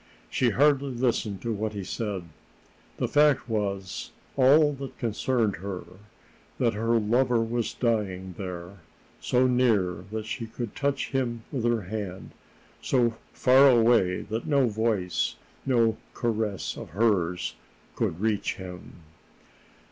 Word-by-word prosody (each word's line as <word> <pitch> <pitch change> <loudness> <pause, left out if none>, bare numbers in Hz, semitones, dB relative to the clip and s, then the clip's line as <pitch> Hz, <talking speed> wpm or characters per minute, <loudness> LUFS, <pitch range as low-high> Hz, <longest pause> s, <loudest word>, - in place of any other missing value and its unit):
She 125 - +2
hardly 140 +3 +3
listened 115 -5 -1
to 115 -1 -1
what 110 +1 -2
he 100 -2 -4
said. 100 -1 -3 0.7
The - - 0
fact 150 -3 +3
was 100 -4 -3 0.3
all 145 +3 +5
that 135 -1 -8
concerned 115 -2 0
her 95 +1 -5 0.7
that 120 -2 +2
her 115 +2 +1
lover 120 +3 +2
was 115 0 -1
dying 95 -6 -1
there, 90 0 -7 0.4
so 125 +1 +2
near 110 -9 +2
that 110 -1 -3
she 115 +1 -4
could 115 -1 -6
touch 140 -1 -1
him 120 -4 -1
with 125 -5 -2
her 120 -3 +1
hand, 95 -1 -6 0.5
so 120 -3 +2 0.2
far 135 +2 +6
away 115 -7 +4
that 110 +7 -4
no 140 -4 +3
voice, 110 -5 0 0.3
no 115 -4 +3 0.2
caress 110 -7 -1
of - - -8
hers, 90 -6 +1 0.4
could 80 - -1
reach 105 -1 0
him. 90 -1 -9
115 Hz, 130 wpm, -27 LUFS, 100-125 Hz, 0.7 s, far